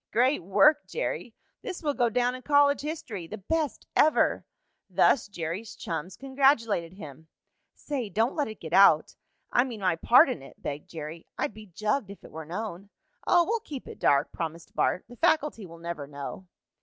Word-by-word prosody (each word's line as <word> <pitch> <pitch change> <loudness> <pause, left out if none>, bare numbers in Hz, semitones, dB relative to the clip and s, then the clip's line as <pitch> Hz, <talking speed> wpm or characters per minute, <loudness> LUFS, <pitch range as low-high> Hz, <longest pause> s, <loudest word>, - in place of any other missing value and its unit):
"Great 255 +6 +2
work, 205 - +4
Jerry!" - - -4 0.3
"This 370 -6 -6
will 295 -2 +1
go 245 -3 +2
down 245 +2 +1
in 255 - -7
college 285 0 +4
history!" 255 - -5
"The 215 - -7
best 305 - -2
ever!" 310 - +3 0.5
Thus 240 - +3
Jerry's 185 +3 -5
chums 170 -1 -5
congratulated 260 - +1
him. 160 -4 -11 0.5
"Say, 265 -7 -4
don't 225 +6 +1
let 295 - -1
it 220 - -9
get - - -8
out - - +6 0.4
I 245 - +4
mean 235 -5 -7
my 185 -3 +1
part 250 - +6
in 250 - -3
it!" 135 - -14
begged 145 +1 -6
Jerry. 160 0 -8
"I'd - - -2
be 215 0 -12
jugged 210 +5 -1
if 200 - -11
it - - -13
were 160 0 -7
known." 195 +2 -6 0.4
"Oh, 350 -1 +5
we'll 455 +5 0
keep 285 - -8
it - - -10
dark," 140 - +3
promised 165 0 -6
Bart. - - +1
"The 245 +1 -13
faculty 300 - +1
will 165 0 -12
never 170 -4 -6
know." 145 +6 -8
215 Hz, 180 wpm, -27 LUFS, 170-275 Hz, 0.5 s, out